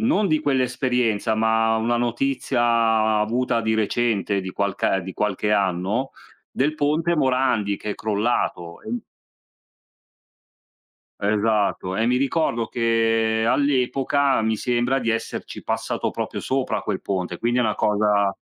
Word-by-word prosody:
non 220 Hz, -3 st, +2 dB
di 155 Hz, -3 st, +1 dB
quell'esperienza, 125 Hz, -5 st, 0 dB
ma 110 Hz, 0 st, +2 dB
una 120 Hz, +2 st, 0 dB
notizia 115 Hz, -3 st, +1 dB
avuta 115 Hz, +2 st, 0 dB
di 110 Hz, 0 st, 0 dB
recente, 110 Hz, -2 st, 0 dB
di 95 Hz, -, -6 dB
qualcae 95 Hz, -1 st, -1 dB
di 95 Hz, +1 st, -7 dB
qualche 105 Hz, 0 st, -1 dB
anno, 100 Hz, +6 st, 0 dB, 0.4 s
del 150 Hz, +4 st, 0 dB
ponte 155 Hz, +3 st, +1 dB
Morandi, 130 Hz, -7 st, +1 dB
che 105 Hz, -, -5 dB
è -, -, -3 dB
crollato. 105 Hz, -5 st, -2 dB
E 235 Hz, +2 st, -4 dB, 2.2 s
Esatto. 105 Hz, -2 st, 0 dB
E 110 Hz, -, +1 dB
mi 125 Hz, -, +2 dB
ricordo 130 Hz, -4 st, 0 dB
che 115 Hz, -1 st, +1 dB
all'epoca, 135 Hz, 0 st, +1 dB
mi 110 Hz, 0 st, 0 dB
sembra 125 Hz, +4 st, 0 dB
di 115 Hz, -, -1 dB
esserci 115 Hz, 0 st, -4 dB
passato -, -, -2 dB
proprio -, -, -4 dB
sopra 130 Hz, 0 st, -1 dB
a -, -, -4 dB
quel 100 Hz, -3 st, -3 dB
ponte, 90 Hz, -3 st, -3 dB
quindi 120 Hz, +4 st, 0 dB
è -, -, +3 dB
una 110 Hz, -2 st, 0 dB
cosa 105 Hz, -1 st, +2 dB
115 Hz, 135 wpm, -23 LUFS, 105-130 Hz, 2.2 s, è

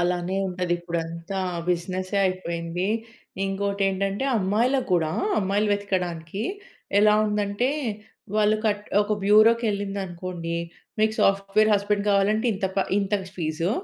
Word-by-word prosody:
అలానే 175 Hz, +1 st, 0 dB
ఉంటదిప్పుడంతా 175 Hz, 0 st, -3 dB, 0.3 s
బిజినెసే 185 Hz, +3 st, -2 dB
అయిపోయింది. 175 Hz, 0 st, -3 dB, 0.6 s
ఇంకోటేంటంటే, 195 Hz, +2 st, -1 dB
అమ్మాయిలకు 235 Hz, +7 st, +1 dB
గూడా, 160 Hz, -3 st, +2 dB, 0.3 s
అమ్మాయిలు 200 Hz, +2 st, +1 dB
వెతకడానికి 185 Hz, -2 st, -2 dB, 0.6 s
ఎలా 210 Hz, 0 st, +6 dB
ఉందంటే, 210 Hz, +3 st, 0 dB, 0.7 s
వాళ్ళు 215 Hz, 0 st, +4 dB
కట్ 210 Hz, -1 st, 0 dB, 0.2 s
ఒక 210 Hz, -, -2 dB
బ్యూరో‌కెళ్ళిందనుకోండీ, 200 Hz, -6 st, +2 dB, 0.4 s
మీకు 220 Hz, 0 st, +2 dB
సాఫ్ట్‌వేర్ 195 Hz, +2 st, +3 dB
హస్బెండ్ 205 Hz, 0 st, 0 dB
గావాలంటే 205 Hz, +3 st, +2 dB
ఇంత 190 Hz, 0 st, -1 dB
ప -, -, +3 dB, 0.2 s
ఇంత 195 Hz, 0 st, -2 dB
క -, -, -10 dB
ఫీజు, 165 Hz, +1 st, -1 dB
195 Hz, 105 wpm, -25 LUFS, 175-210 Hz, 0.7 s, ఎలా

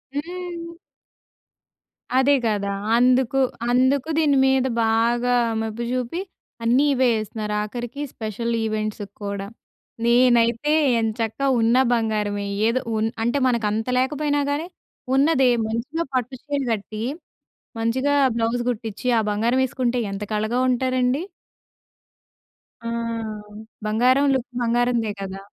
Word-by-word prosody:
హ్మ్. 340 Hz, +1 st, -6 dB, 1.4 s
అదే 270 Hz, +2 st, +4 dB
కదా! 205 Hz, -2 st, -1 dB, 0.3 s
అందుకు, 255 Hz, +1 st, +3 dB, 0.3 s
అందుకు 260 Hz, +4 st, +2 dB
దీని 290 Hz, -3 st, +3 dB
మీద 265 Hz, -1 st, +3 dB, 0.2 s
బాగా 235 Hz, +2 st, +2 dB, 0.3 s
మెప్పు 225 Hz, +1 st, -4 dB
జూపి, 255 Hz, +7 st, -2 dB, 0.4 s
అన్నీ 250 Hz, +5 st, +3 dB
ఇవే 260 Hz, -1 st, +3 dB
యేస్తున్నారు. 215 Hz, -1 st, -3 dB
ఆఖరికి 240 Hz, +5 st, -6 dB
స్పెషల్ 230 Hz, +2 st, -3 dB
ఈవెంట్స్ 215 Hz, -1 st, -2 dB, 0.2 s
కూడా. 200 Hz, -1 st, -4 dB, 0.6 s
నేనైతే 240 Hz, +2 st, +3 dB, 0.3 s
ఏం 225 Hz, -, +1 dB
చక్క 225 Hz, +1 st, -2 dB, 0.2 s
ఉన్న 230 Hz, +1 st, +3 dB, 0.2 s
బంగారమే 210 Hz, -3 st, -1 dB, 0.2 s
ఏదో 255 Hz, +3 st, +1 dB, 0.2 s
ఉన్ 220 Hz, -, +1 dB, 0.2 s
అంటే 240 Hz, +5 st, +1 dB
మనకు 235 Hz, -3 st, +1 dB
అంత 220 Hz, +3 st, -2 dB
లేకపోయినా 290 Hz, +2 st, 0 dB
గానీ, 305 Hz, +4 st, -2 dB, 0.5 s
ఉన్నదే 270 Hz, -2 st, +4 dB, 0.2 s
మంచిగా 265 Hz, +9 st, -2 dB
పట్టు 255 Hz, 0 st, -1 dB
చీర 285 Hz, -1 st, -2 dB
కట్టీ, 215 Hz, 0 st, -3 dB, 0.8 s
మంచిగా 260 Hz, +5 st, +1 dB, 0.2 s
బ్లౌజ్ 230 Hz, +1 st, 0 dB
గుట్టిచి 225 Hz, 0 st, -4 dB
ఆ -, -, +2 dB
బంగారం 235 Hz, +5 st, +1 dB
యేసుకుంటే 250 Hz, -1 st, -1 dB
ఎంత 195 Hz, +1 st, -4 dB
కళగా 215 Hz, +3 st, 0 dB
ఉంటారండి. 255 Hz, +2 st, +1 dB, 1.6 s
ఆ! -, -, -2 dB, 1.0 s
బంగారం 250 Hz, +6 st, +3 dB
లుక్ 260 Hz, 0 st, -2 dB
బంగారందే 235 Hz, -2 st, +1 dB
కదా! 195 Hz, 0 st, -6 dB
240 Hz, 115 wpm, -23 LUFS, 220-265 Hz, 1.6 s, అదే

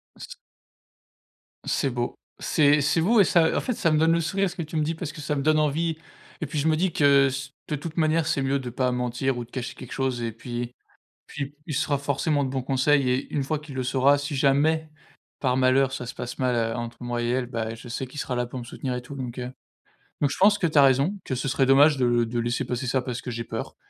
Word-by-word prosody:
Ce -, -, -10 dB, 1.4 s
C'est 140 Hz, -, 0 dB
beau, 120 Hz, -1 st, -3 dB, 0.2 s
c'est 145 Hz, -1 st, +3 dB
c'est 150 Hz, +4 st, +2 dB
vous 220 Hz, +7 st, +4 dB
et -, -, +8 dB
ça, 170 Hz, -3 st, +3 dB
en -, -, +1 dB
fait, 250 Hz, -, -1 dB
ça 170 Hz, -7 st, +1 dB
me 155 Hz, -, +3 dB
donne 160 Hz, +1 st, +4 dB
le 170 Hz, -, +2 dB
sourire 195 Hz, +4 st, 0 dB
ce 175 Hz, -, -10 dB
que 180 Hz, -, -4 dB
tu 160 Hz, 0 st, -7 dB
me 155 Hz, -, +2 dB
dis. 160 Hz, +2 st, -1 dB
Parce 160 Hz, -2 st, -5 dB
que 155 Hz, -, -9 dB
ça 150 Hz, 0 st, -2 dB
me 140 Hz, -, -1 dB
donne 155 Hz, +2 st, +3 dB
envie 155 Hz, +2 st, 0 dB, 0.4 s
et -, -, -2 dB
puis 150 Hz, +1 st, -3 dB
je 145 Hz, -, +1 dB
me 160 Hz, -, +4 dB
dis 180 Hz, 0 st, 0 dB
que 140 Hz, -2 st, +5 dB
ce 135 Hz, +1 st, -5 dB, 0.2 s
de 150 Hz, -, 0 dB
toute 155 Hz, +3 st, -7 dB
manière, 160 Hz, -1 st, +2 dB
c'est 140 Hz, -, +1 dB
mieux 135 Hz, +1 st, +1 dB
de 130 Hz, -2 st, -5 dB
pas 125 Hz, +1 st, 0 dB
mentir 125 Hz, +1 st, -1 dB
ou 120 Hz, -, -3 dB
de 120 Hz, -, -17 dB
cacher 125 Hz, -2 st, -5 dB
quelque 130 Hz, -, -11 dB
chose 130 Hz, -2 st, -1 dB
et 115 Hz, -1 st, -2 dB
puis 120 Hz, +1 st, -6 dB, 0.5 s
puis 140 Hz, 0 st, -6 dB
il 150 Hz, -, -4 dB
sera 145 Hz, +1 st, +1 dB
forcément 145 Hz, +1 st, 0 dB
de 130 Hz, -, -3 dB
bons 130 Hz, -1 st, -2 dB
conseils 135 Hz, +1 st, +2 dB
et 125 Hz, +1 st, -1 dB
une 140 Hz, -, 0 dB
fois 155 Hz, +3 st, -1 dB
qu'il 150 Hz, -2 st, -10 dB
le 130 Hz, -, -1 dB
saura, 135 Hz, +3 st, +3 dB
si 145 Hz, +1 st, -4 dB
jamais, 150 Hz, +4 st, +2 dB, 0.5 s
par 130 Hz, -2 st, +1 dB
malheur, 130 Hz, +1 st, +3 dB
ça 130 Hz, -2 st, -5 dB
se -, -, -6 dB
passe 125 Hz, 0 st, -6 dB
mal, 125 Hz, -1 st, +1 dB
heu, 115 Hz, -1 st, 0 dB
entre 120 Hz, -1 st, -5 dB
moi 120 Hz, -1 st, -2 dB
et 120 Hz, -, -1 dB
elle, 125 Hz, +1 st, 0 dB
bah, 115 Hz, -2 st, -3 dB
je 115 Hz, +2 st, -11 dB
sais 130 Hz, +3 st, -4 dB
qu'il 130 Hz, +4 st, -11 dB
sera 125 Hz, -, -3 dB
là 125 Hz, 0 st, -1 dB
pour 125 Hz, +2 st, -7 dB
me 120 Hz, -, -6 dB
soutenir 125 Hz, +1 st, -4 dB
et 125 Hz, -, -3 dB
tout, 135 Hz, +3 st, -9 dB
donc, 125 Hz, -2 st, -6 dB
heu. 125 Hz, 0 st, -5 dB, 0.7 s
Donc, 145 Hz, -2 st, +2 dB
je -, -, -4 dB
pense 205 Hz, +2 st, +6 dB
que 180 Hz, -, +1 dB
tu 155 Hz, -, -2 dB
as -, -, +9 dB
raison, 135 Hz, +8 st, +3 dB
que 130 Hz, -, -2 dB
ce 125 Hz, +2 st, -3 dB
serait 135 Hz, +1 st, +2 dB
dommage 140 Hz, +3 st, +6 dB
de 120 Hz, -2 st, +2 dB
de 120 Hz, +1 st, -2 dB
laisser 120 Hz, +1 st, -1 dB
passer 125 Hz, +1 st, -3 dB
ça 130 Hz, +1 st, +1 dB
parce 125 Hz, -1 st, -5 dB
que -, -, -6 dB
j'ai 115 Hz, 0 st, -4 dB
peur. -, -, -6 dB
135 Hz, 270 wpm, -25 LUFS, 125-150 Hz, 1.4 s, as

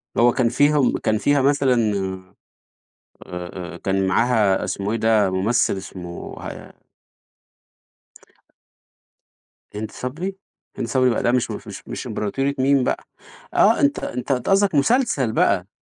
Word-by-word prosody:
اللي 120 Hz, -, +4 dB
هو -, -, +5 dB
كان 125 Hz, -3 st, +2 dB
فيهم 145 Hz, +1 st, +3 dB
كان 110 Hz, 0 st, 0 dB
فيها 145 Hz, +4 st, +2 dB
مثلًا 140 Hz, -2 st, +3 dB, 1.5 s
آآ، 90 Hz, 0 st, -7 dB
آآ -, -, -8 dB
كان 95 Hz, +1 st, 0 dB
معاها 105 Hz, -1 st, +2 dB
اسمه 100 Hz, +2 st, -3 dB
إيه 115 Hz, -, 0 dB
ده، 110 Hz, -3 st, +3 dB
مُمثِّل 100 Hz, +2 st, +1 dB
اسمه 90 Hz, -2 st, -8 dB
ه -, -, -10 dB, 2.9 s
هند 105 Hz, +1 st, -5 dB
صبري؟ 170 Hz, +10 st, -5 dB, 0.4 s
هند 120 Hz, -, -3 dB
صبري 130 Hz, 0 st, +2 dB
بقى 115 Hz, -, -1 dB
ده 120 Hz, -, +3 dB
مش 125 Hz, -1 st, +2 dB
ف -, -, -7 dB
مش -, -, -9 dB
مش -, -, -6 dB
إمبراطورية 135 Hz, +7 st, -2 dB
ميم 135 Hz, 0 st, +3 dB
بقى. -, -, -2 dB, 0.5 s
آه، -, -, +4 dB
أنت 140 Hz, 0 st, +2 dB
أنت 125 Hz, +2 st, -4 dB
أنت 125 Hz, +4 st, -1 dB
قصدك 195 Hz, -2 st, +3 dB
مسلسل 145 Hz, -, +2 dB
بقى، 95 Hz, -4 st, +2 dB
120 Hz, 140 wpm, -22 LUFS, 100-140 Hz, 2.9 s, هو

